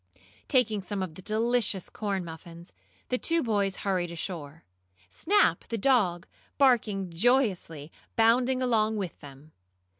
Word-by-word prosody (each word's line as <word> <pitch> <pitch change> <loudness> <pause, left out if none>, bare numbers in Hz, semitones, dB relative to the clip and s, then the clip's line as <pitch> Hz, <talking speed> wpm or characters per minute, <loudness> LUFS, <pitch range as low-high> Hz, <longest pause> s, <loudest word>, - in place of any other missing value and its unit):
Taking 220 -6 +2
some 195 0 -4
of 180 -4 -6
the 185 - -10
delicious 220 -2 0
corn 195 -4 -3
muffins, 165 +1 -11 0.4
the 250 - 0
two 335 0 +2
boys 200 -4 0
hurried 185 -3 0
ashore, 165 -3 -6 0.5
Snap, 405 - +2
the 230 - -3
dog, 195 -8 +2 0.3
barking 215 -9 +2
joyously, 180 - 0 0.2
bounding 250 +3 +3
along 220 -3 +1
with 190 -5 -5
them. 145 +2 -13
200 Hz, 125 wpm, -28 LUFS, 175-240 Hz, 0.5 s, bounding